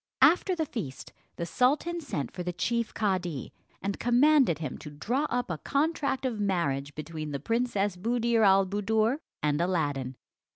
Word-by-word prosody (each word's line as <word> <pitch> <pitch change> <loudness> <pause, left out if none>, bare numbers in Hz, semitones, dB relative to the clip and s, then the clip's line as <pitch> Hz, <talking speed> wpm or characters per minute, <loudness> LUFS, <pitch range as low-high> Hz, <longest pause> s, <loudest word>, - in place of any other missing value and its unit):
After 365 +2 +5
the 320 -2 -1
feast, 210 - -6 0.2
the 170 - -3
sultan 295 - +1
sent 195 - -4
for 180 - -6
the 180 0 -2
chief 230 +6 -1
cadi, 180 - -2 0.3
and 200 0 -2
commanded 250 - +4
him 150 -4 -5
to 150 - -8
draw 240 - -1
up 245 -5 -1
a 160 - -3
contract 280 -2 0
of 235 -4 -1
marriage 145 -8 -1
between 155 0 -5
the 140 -1 -3
Princess 205 - 0
Buddir 235 +3 +1
al 195 -2 +6
Buddoor 215 +5 +1 0.3
and 150 +1 +2
Aladdin. 145 -8 -1
200 Hz, 160 wpm, -28 LUFS, 160-245 Hz, 0.3 s, al